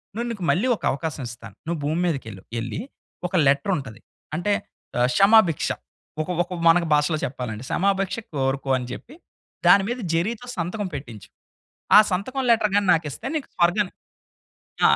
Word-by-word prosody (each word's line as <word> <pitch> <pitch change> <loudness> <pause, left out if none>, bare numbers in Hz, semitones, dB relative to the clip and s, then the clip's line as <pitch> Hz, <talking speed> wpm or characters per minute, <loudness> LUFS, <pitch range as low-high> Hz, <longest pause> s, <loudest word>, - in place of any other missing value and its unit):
నేను 235 +2 -2
నీకు 205 -5 -6
మళ్ళీ 215 +9 +1
ఒక - - -17
అవకాశమిస్తాను. 125 -7 -6
నువ్వు 170 -1 -2
భూమి 155 +3 0
మీదకేళ్ళు. 115 - -4 0.2
ఎళ్ళి 120 +6 -4 0.5
ఒక - - -4
లెటరుంటది 140 - 0 0.4
అంటే 190 +5 0 0.5
ఆహ్, 125 - +4
క్షమాభిక్ష 195 -6 +5 0.5
ఒక 155 - -5
ఒక 180 +1 -3
మన 165 +1 +7
భాషలో 150 +2 +2
చెప్పాలంటే 125 -3 -4
సమాభిక్ష 195 +1 +1 0.2
కోరుకో 135 0 -1
అని 125 - -5
చెప్పి 255 - -9 0.5
దాని 200 -1 +7
మీద 245 +2 -2 0.2
జెరీ‌తో 215 +8 -1
సంతకం 185 +4 -2
పెట్టించు. 120 -8 -8 0.7
ఆ - - +12
సంతకం 250 +9 -2
లెటర్ 215 -3 +3
గాని 205 -1 +2
నాకిస్తే 160 - -4
నీకు 290 - -4
స్వర్గాని 180 +3 +2 1.0
ఆ! - - +5
170 Hz, 145 wpm, -24 LUFS, 135-200 Hz, 1.0 s, ఆ